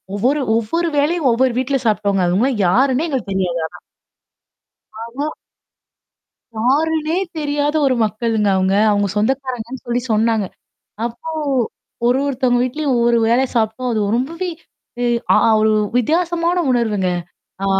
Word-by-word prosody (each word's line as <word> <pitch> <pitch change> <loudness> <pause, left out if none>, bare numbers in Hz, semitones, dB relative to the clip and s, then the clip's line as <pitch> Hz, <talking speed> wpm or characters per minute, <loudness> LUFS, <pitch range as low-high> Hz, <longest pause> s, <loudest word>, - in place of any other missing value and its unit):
ஒவ்வொரு 265 +8 +1
ஒவ்வொரு 280 +10 0
வேளையும் 295 -1 +2
ஒவ்வொரு 250 +1 +2
வீட்ல 270 +2 0
சாப்டோங்க. 200 -3 +1
அவுங்கல்லாம் 210 +7 +1
யாருன்னே 260 - +2
எங்களுக்கு 260 -9 -3
தெரியாது. 180 -3 -1
ஆனா. - - -14 1.3
ஆனா. 255 +6 -4 1.3
யாருனே 310 +7 +1 0.2
தெரியாத 290 0 -1
ஒரு 260 -2 +2
மக்களுங்க 215 -1 0
அவங்க. 190 +1 +1 0.2
அவங்க 205 -1 +1
சொந்தக்காரங்கன்னு 255 +1 -2
சொல்லி 240 +1 0
சொன்னாங்க. 220 -1 +2 0.6
அப்போ 240 +7 -6 0.8
ஒரு 250 +2 +3
ஒருத்தவங்க 255 -3 +1
வீட்லயும் 270 +1 -1
ஒவ்வொரு 235 0 +3
வேள 235 +3 +3
சாப்ட்டோம். 230 +2 0
அது 220 - 0 0.2
ரொம்பவே 335 +8 -3 0.5
இய 240 - +1 0.2
அ - - +5 0.3
ஒரு 220 0 +3 0.2
வித்தியாசமான 340 +6 +1
உணர்வுங்க. 210 -6 +1 0.6
ஆ - - 0
245 Hz, 120 wpm, -18 LUFS, 220-285 Hz, 1.3 s, அ